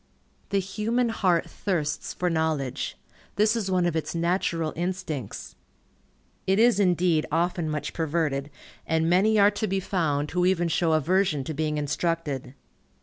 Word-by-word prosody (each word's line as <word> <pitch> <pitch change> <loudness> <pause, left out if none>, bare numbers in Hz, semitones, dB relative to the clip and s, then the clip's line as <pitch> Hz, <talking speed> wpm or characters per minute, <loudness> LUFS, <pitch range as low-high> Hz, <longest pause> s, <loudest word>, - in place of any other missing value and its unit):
The 200 - +1
human 225 +5 0
heart 180 -6 +1
thirsts 160 -7 -2
for 180 - -2
knowledge. 160 -6 -1 0.4
This 215 +2 +3
is 210 -4 -2
one 180 -2 +2
of 175 -2 0
its 160 +1 -2
natural 170 -2 0
instincts. 175 - -4 0.9
It 190 +1 +3
is 230 -2 +4
indeed 175 -4 +2
often 170 0 0
much 150 -1 -3
perverted, 150 -3 -1 0.4
and 160 0 +1
many 195 +6 +4
are 205 0 +6
to 210 +1 -2
be 195 0 0
found 150 -6 -1
who 180 +1 +1
even 175 -2 +2
show 165 0 +2
aversion 155 -1 +2
to 155 - -4
being 155 0 -1
instructed. 145 -3 -2
170 Hz, 145 wpm, -26 LUFS, 155-190 Hz, 0.9 s, are